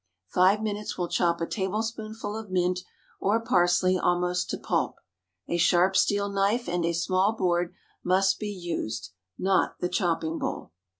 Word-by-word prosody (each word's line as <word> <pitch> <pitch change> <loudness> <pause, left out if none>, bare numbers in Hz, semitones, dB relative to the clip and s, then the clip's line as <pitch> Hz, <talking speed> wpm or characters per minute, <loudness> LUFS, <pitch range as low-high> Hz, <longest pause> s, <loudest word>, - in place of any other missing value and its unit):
Five 190 +4 +3
minutes 210 -1 -3
will 175 -1 -2
chop 170 -1 +1
a - - +1
tablespoonful 215 +2 -3
of 220 -2 -6
mint 180 0 +1 0.4
or 210 +4 +2
parsley 185 -3 +3
almost 180 0 +1
to - - -2
pulp. - - -1 0.5
A 170 - 0
sharp 175 +2 +4
steel 200 +1 +3
knife 200 +4 0
and 175 0 -1
a 170 +1 +1
small 185 +4 +2
board 175 -4 0 0.3
must 190 +1 +2
be 210 - -3
used, 160 - -4 0.3
not 190 0 +1
the 180 - -1
chopping 165 -3 0
bowl. - - -4
185 Hz, 155 wpm, -27 LUFS, 175-205 Hz, 0.5 s, sharp